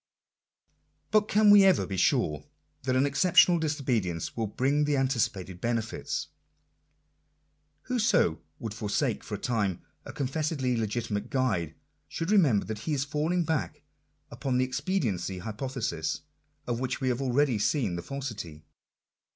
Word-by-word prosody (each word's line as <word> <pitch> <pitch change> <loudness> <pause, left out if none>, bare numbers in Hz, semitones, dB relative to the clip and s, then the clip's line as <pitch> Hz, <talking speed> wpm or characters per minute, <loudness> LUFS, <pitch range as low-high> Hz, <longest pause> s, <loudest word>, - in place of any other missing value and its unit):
But 215 -1 +4
can 210 0 +5
we 205 -1 +9
ever 190 -2 +4
be 95 - -4
sure 75 -4 +1 0.4
that 130 -1 0
an 130 +2 +4
exceptional 170 +4 +5
disobedience 125 - -1
will 115 -2 -1
bring 140 +7 +1
the 145 -1 +1
anticipated 105 -9 -1
benefits? 115 -2 -2 1.5
Whoso 220 - +2 0.2
would 115 -3 -5
forsake 115 +3 -1
for 105 - -5
a - - -4
time 105 -6 -1 0.2
a - - -8
confessedly 140 -2 -1
legitimate 110 -1 -2
guide, 95 - 0 0.3
should 165 +4 -3
remember 150 - +4
that 110 -1 -5
he - - +1
is 135 0 -1
falling 155 +5 0
back 160 -1 -2 0.5
upon 130 -2 -1
that 130 - +3
expediency 125 - -1
hypothesis 110 - -3 0.4
of 120 -1 -2
which 130 0 -2
we 130 -2 0
have 125 +1 -1
already 130 -2 +2
seen 105 - +1
the 85 - -4
falsity. 105 - -6
130 Hz, 135 wpm, -28 LUFS, 105-150 Hz, 1.5 s, we